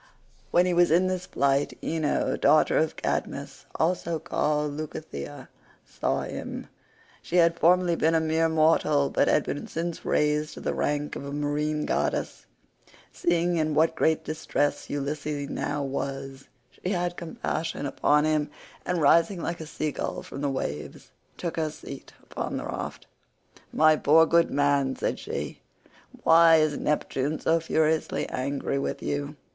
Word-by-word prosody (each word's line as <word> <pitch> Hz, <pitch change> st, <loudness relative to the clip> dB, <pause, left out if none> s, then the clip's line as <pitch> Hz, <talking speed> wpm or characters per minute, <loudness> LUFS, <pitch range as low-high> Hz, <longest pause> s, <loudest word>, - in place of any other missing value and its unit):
When 175 Hz, +1 st, +4 dB
he 180 Hz, -, +1 dB
was 175 Hz, 0 st, +4 dB
in 170 Hz, +4 st, +4 dB
this 185 Hz, -1 st, -2 dB
plight, 140 Hz, 0 st, +1 dB
Ino 160 Hz, -2 st, 0 dB
daughter 150 Hz, +2 st, +4 dB
of 160 Hz, 0 st, +1 dB
Cadmus, -, -, -4 dB
also 170 Hz, 0 st, 0 dB
called 150 Hz, -1 st, -1 dB
Leucothea, 145 Hz, -, -7 dB, 0.4 s
saw -, -, -1 dB
him. -, -, -6 dB, 0.6 s
She -, -, -5 dB
had 170 Hz, -1 st, +4 dB
formerly 175 Hz, 0 st, +4 dB
been 165 Hz, 0 st, +2 dB
a -, -, +4 dB
mere 160 Hz, +1 st, +1 dB
mortal, 155 Hz, -3 st, +3 dB
but -, -, +2 dB
had 150 Hz, -, +3 dB
been 145 Hz, -, -4 dB
since 170 Hz, +1 st, -4 dB
raised 150 Hz, 0 st, +1 dB
to -, -, -8 dB
the -, -, -2 dB
rank 145 Hz, 0 st, -1 dB
of -, -, -6 dB
a 140 Hz, -, -6 dB
marine 150 Hz, +1 st, -1 dB
goddess. -, -, -2 dB, 0.6 s
Seeing 175 Hz, 0 st, +1 dB
in 155 Hz, -1 st, 0 dB
what 160 Hz, +1 st, +3 dB
great 160 Hz, 0 st, +1 dB
distress 155 Hz, -2 st, -2 dB
Ulysses 145 Hz, 0 st, -3 dB
now 145 Hz, 0 st, -2 dB
was, 135 Hz, 0 st, -5 dB, 0.2 s
she 185 Hz, -, -4 dB
had 175 Hz, -1 st, -1 dB
compassion 165 Hz, -2 st, -4 dB
upon 150 Hz, +1 st, +2 dB
him, 155 Hz, -1 st, +1 dB, 0.3 s
and, 175 Hz, -3 st, -1 dB
rising 170 Hz, +6 st, +4 dB
like 170 Hz, 0 st, -4 dB
a 160 Hz, -, -7 dB
sea 155 Hz, 0 st, -2 dB
gull -, -, -4 dB
from 135 Hz, -, -8 dB
the 145 Hz, -, 0 dB
waves, 75 Hz, -, -5 dB, 0.3 s
took 170 Hz, -2 st, -4 dB
her 160 Hz, -1 st, 0 dB
seat 140 Hz, -2 st, -10 dB
upon -, -, -4 dB
the -, -, -5 dB
raft. -, -, -5 dB, 0.7 s
"My 155 Hz, 0 st, +5 dB
poor 160 Hz, +2 st, +5 dB
good 170 Hz, +1 st, +3 dB
man," 140 Hz, -2 st, +1 dB
said -, -, -2 dB
she, -, -, -5 dB, 0.6 s
"why 165 Hz, 0 st, +7 dB
is 155 Hz, -2 st, +3 dB
Neptune 150 Hz, 0 st, -1 dB
so 165 Hz, +1 st, +2 dB
furiously 160 Hz, -1 st, 0 dB
angry 140 Hz, +1 st, -2 dB
with -, -, -3 dB
you? 145 Hz, +1 st, -3 dB
155 Hz, 155 wpm, -26 LUFS, 145-165 Hz, 0.7 s, why